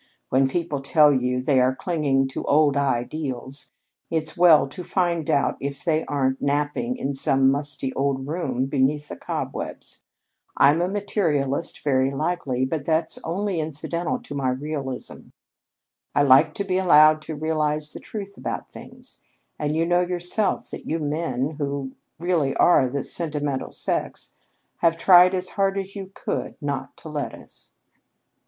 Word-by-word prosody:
"When 135 +1 +3
people 150 -1 -2
tell 150 +1 +5
you 125 -1 0
they 135 0 +3
are 130 +1 +3
clinging 140 -5 0
to - - -5
old 145 -1 +4
ideals, 135 0 -2 0.4
it's 155 -1 -2
well 170 -5 +6
to 160 +6 -8
find 170 -4 -1
out 145 -3 +2
if 140 0 -5
they 160 -2 +2
aren't 135 -2 -1
napping 145 - -1
in 140 - -2
some 135 0 +3
musty 140 -2 -2
old 135 -1 -1
room 140 -6 -1
beneath 145 +2 0
the - - -6
cobwebs. - - -5 0.5
I'm 145 +4 +5
a 175 - +1
materialist, 170 -7 -1
very 130 -2 +2
likely, 140 -3 -1
but 145 +2 -3
that's 160 +1 0
only 190 +1 -2
incidental 160 - -2
to 240 - -8
my 135 -2 0
realism. 135 0 -5 0.9
I 145 - +4
like 135 -1 +5
to 200 - -2
be 185 -1 0
allowed 155 -3 +6
to 155 0 -6
realize 150 -1 -1
the - - -7
truth 200 -2 -8
about - - -5
things, - - -11 0.4
and 150 0 -1
you 165 +1 +2
know 175 +1 +3
yourself 180 +4 -1
that - - -8
you 160 - 0
men 150 -2 -2
who 140 -2 -3 0.3
really 165 -5 0
are 140 -7 +5
the 140 +2 -3
sentimental 145 -5 -2
sex - - -3 0.4
have 165 -1 +2
tried 180 +1 +7
as 185 0 -2
hard 195 -1 0
as 195 +1 -5
you 195 -2 -6
could - - -3
not 140 -2 -4
to 160 - -10
let 150 -2 -4
us." - - -10
150 Hz, 155 wpm, -24 LUFS, 135-170 Hz, 0.9 s, tried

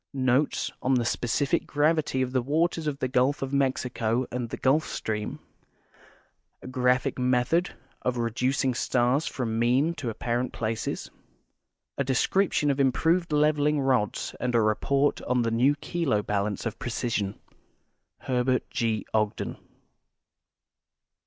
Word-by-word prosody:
Notes 130 +2 +1
on 130 +1 +2
the 120 -2 +1
Specific 140 +8 0
Gravity 150 -3 +1
of 125 - -3
the 130 -1 +1
Waters 160 +4 0
of 145 -2 -1
the 130 - -1
Gulf 130 +3 +1
of 135 - -4
^lexico 130 -3 0
and 125 -1 -3
the - - -5
Gulf 145 +4 +3
Stream; 105 -1 -3 1.3
A - - -8
Graphic 125 0 +1
Method 125 +8 +1 0.3
of 125 -1 -1
Reducing 125 +3 0
Stars 125 +4 +1
from 115 -3 -2
^lean 135 +8 +2
to 135 -5 -3
Apparent 120 +3 -2
Places; 110 0 -3 0.9
A - - +3
Description 145 +4 +2
of 140 - -2
Improved 165 +6 +2
Leveling 150 0 +2
Rods 130 -6 0
and 125 -1 -1
a 115 - +5
Report 140 +7 +1
on 125 -1 0
the 115 - 0
New 125 +6 +3
Kilo 145 -8 -1
Balance 100 +1 -2
of 115 -1 -4
Precision. 115 -4 -2 0.8
Herbert 125 0 0
G. 110 -2 -1
Ogdex. 105 -1 -1
130 Hz, 135 wpm, -27 LUFS, 120-145 Hz, 1.3 s, a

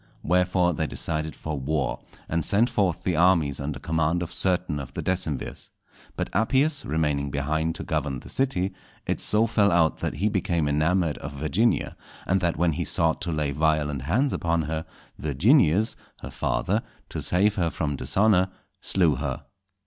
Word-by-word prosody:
Wherefore 90 +1 +2
they 80 0 -1
decided 80 0 -3
for 80 -2 -4
war, 70 -1 -1 0.3
and 85 0 -1
sent 115 +8 +2
forth 95 -8 0
the 90 - 0
armies 85 -5 +3
under 70 -1 -3
command 80 +3 0
of 85 - -7
certain 90 -5 +1
of 70 -2 -8
the - - -3
decemvirs. 90 -7 -3 0.5
But - - -3
Appius 135 +8 +2
remaining 75 -2 0
behind 80 +4 -1
to 100 - -5
govern 75 -6 -2
the - - -13
city, 120 -9 0 0.3
it - - -2
so 110 +2 +4
fell 105 -2 +3
out 80 -2 +3
that - - -3
he 95 +8 0
became 90 -6 0
enamoured 80 +2 +1
of 70 - -7
Virginia, 80 +11 0 0.3
and 95 0 +1
that 85 -3 0
when 85 +1 +2
he - - -2
sought 80 -1 0
to 85 - -2
lay 75 -2 -1
violent 75 -2 0
hands 115 - +1
upon 85 -1 0
her, 80 +1 -4 0.3
Virginius, 90 - +3 0.3
her - - -7
father, - - 0 0.3
to - - -5
save 100 +4 +2
her 90 -5 0
from 75 -3 -2
dishonour, 95 +4 +2 0.3
slew 85 -8 +2
her. 70 -1 -3
80 Hz, 170 wpm, -25 LUFS, 75-95 Hz, 0.5 s, so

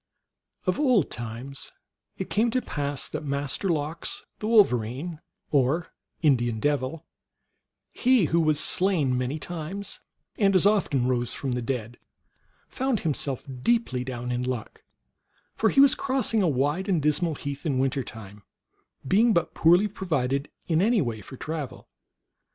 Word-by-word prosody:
Of 185 +5 0
old 250 - +3
times 120 +4 -6 0.5
it - - -5
came 225 +3 +2
to 255 +2 0
pass 145 -2 -2
that - - -5
Master 140 +6 -2
Lox, 155 0 -2 0.2
the 210 - -3
Wolverine, 155 - +2 0.3
or 145 +4 +1 0.3
Indian 120 -6 +2
Devil, 145 +3 -1 0.9
he 250 -6 +3
who 165 +2 +2
was 155 -2 +3
slain 170 -10 +2
many 125 +4 -1
times 175 +5 -6 0.4
and 195 -2 +4
as 185 - +5
often 195 -11 +2
rose 120 -2 0
from 135 - -3
the 125 0 -1
dead, 120 -1 -4 0.7
found 265 -4 -1
him 160 -3 +1
self 135 -2 -3 0.2
deeply 225 - +1
down 125 -1 -4
in 125 0 -1
luck; 125 -3 -4 0.7
for 220 - +2
he - - +2
was 280 0 +8
crossing 260 -5 +1
a 185 - +3
wide 145 +7 0
and 180 -4 +3
dismal 155 +2 +1
heath 140 0 -6
in 145 -5 0
winter 135 0 0
time, 105 -3 -10 0.7
being 220 - +4
but 170 - +1
poorly 175 +5 +5
provided 145 -8 -1 0.2
in 165 -1 +2
any 225 +3 +3
way 115 -4 -4
for 130 - -11
travel. 155 -3 -5
150 Hz, 150 wpm, -26 LUFS, 130-190 Hz, 0.9 s, was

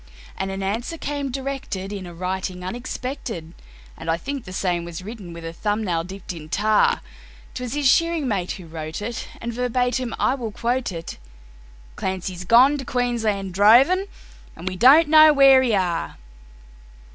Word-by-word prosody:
And 190 - -3
an 195 0 -4
answer 230 +11 -3
came 285 -2 -3
directed 260 -7 -4
in 190 -3 -6
a 175 - -9
writing 185 +1 -4
unexpected 235 - -5 0.4
(And 165 - -7
I 165 - +2
think 275 +7 -5
the 185 - -9
same 180 -2 -1
was 170 +1 -7
written 205 -4 -8
with 170 0 -9
a 165 - -5
thumb 210 +4 -1
nail 170 -4 -1
dipped 190 +1 -8
in 155 -2 -10
tar); 210 +4 +2 0.5
'Twas 250 +1 -5
his 290 -2 +2
shearing 335 0 +3
mate 195 -6 -1
who 185 - -10
wrote 160 +3 -6
it, 230 +2 -5
and 235 0 -5
verbatim 250 0 -1
I - - +2
will 240 -5 -4
quote 240 +2 -1
it: 165 - -7 0.8
"Clancy's 185 -1 -4
gone 260 +8 +5
to - - -4
Queensland 230 -7 -1
droving, 260 - +5 0.5
and 170 +3 -9
we 185 - -2
don't 275 - +7
know 310 0 +8
where 275 -2 +7
he 240 -5 +2
are." 175 - -1
215 Hz, 170 wpm, -23 LUFS, 180-260 Hz, 0.8 s, know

